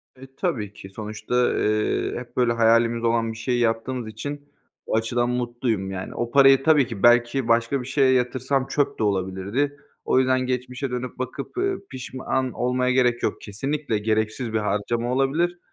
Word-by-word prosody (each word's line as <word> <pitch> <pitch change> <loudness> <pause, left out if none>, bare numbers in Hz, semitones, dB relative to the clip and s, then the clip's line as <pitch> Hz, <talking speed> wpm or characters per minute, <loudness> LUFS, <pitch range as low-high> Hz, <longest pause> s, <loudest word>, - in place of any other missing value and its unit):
E, 135 +1 -14
tabii 115 - -2
ki, 95 - -11
sonuçta, 110 +4 -1
eee, 105 0 0
hep 120 0 -12
böyle 120 -2 +3
hayalimiz 115 0 +3
olan 115 -1 +1
bir 110 - -9
şeyi 120 +1 -1
yaptığımız 115 +1 -1
için 145 +6 -7 0.4
o - - -1
açıdan 120 +2 0
mutluyum 120 -5 -2
yani. 95 -1 -6
O 120 0 -3
parayı, 135 -1 +6
tabii 150 -5 +4
ki, 105 -4 -7
belki 120 +1 +4
başka 115 +3 +2
bir - - -8
şeye 135 -1 +3
yatırsam 130 +2 0
çöp 145 -2 -1
de - - +1
olabilirdi. 100 +8 -1 0.3
O - - +3
yüzden 130 0 +3
geçmişe 125 +1 -3
dönüp 125 0 -4
bakıp, 135 - -5
eee, 390 +1 +1 0.2
pişman 130 0 -3
olmaya 125 +1 0
gerek 125 -2 +2
yok, - - -1
kesinlikle 135 +4 -2
gereksiz 110 +2 -1
bir 110 - +2
harcama 110 +4 -1
olabilir 160 +7 +1
120 Hz, 170 wpm, -24 LUFS, 115-130 Hz, 0.4 s, parayı